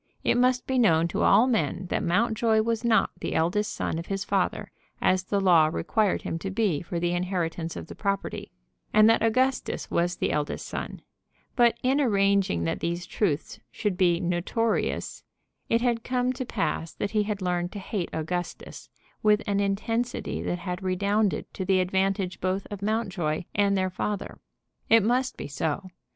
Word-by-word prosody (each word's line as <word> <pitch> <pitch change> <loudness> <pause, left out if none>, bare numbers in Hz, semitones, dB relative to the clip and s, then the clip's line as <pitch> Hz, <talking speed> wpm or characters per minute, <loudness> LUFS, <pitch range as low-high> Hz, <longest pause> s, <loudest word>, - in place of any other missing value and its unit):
It - - +2
must 250 +1 +2
be 260 -1 0
known 165 -8 +4
to - - -2
all 230 - +6
men 195 - 0
that - - +1
Mountjoy 220 +4 +2
was 230 0 -1
not 225 -4 +3
the - - -3
eldest 180 +6 +1
son 160 - -2
of 165 - -7
his 195 0 -2
father, - - -1 0.3
as 185 0 +2
the 200 +1 0
law 175 -5 +5
required 180 +6 0
him 165 - -3
to 195 - -4
be 190 -7 0
for 170 0 -4
the 175 0 0
inheritance 175 -2 -2
of - - -6
the - - -10
property, 200 -1 -3 0.4
and 215 0 +6
that 225 - +4
Augustus 255 +4 0
was 175 +1 +1
the - - -1
eldest 150 -1 -2
son; - - -6 0.5
but 240 -2 +4
in 265 +3 +3
arranging 195 - +2
that 80 - -1
these 170 +1 -2
truths 160 -9 -2
should 210 -4 -2
be 175 -2 +3
notorious 180 +6 -1 0.5
it 230 0 +2
had 235 -2 0
come 250 0 0
to 255 0 -4
pass 180 -7 -2
that 200 - -3
he 215 - +2
had 210 -1 -2
learned 180 -1 -1
to - - -6
hate 195 -2 -3
Augustus 175 +3 -5 0.3
with 210 0 +3
an 200 -2 0
intensity 225 +5 -1
that 175 - -2
had 180 +1 -5
redounded 200 +2 0
to 190 - -4
the 190 0 +2
advantage 190 0 0
both 185 +1 -1
of 205 -2 -6
Mountjoy 195 -7 -1
and 200 -1 +2
their 185 0 0
father. 200 +2 -4 0.5
It 225 -2 +6
must 250 +4 +1
be - - -5
so. 155 +6 -3
195 Hz, 175 wpm, -26 LUFS, 175-220 Hz, 0.5 s, all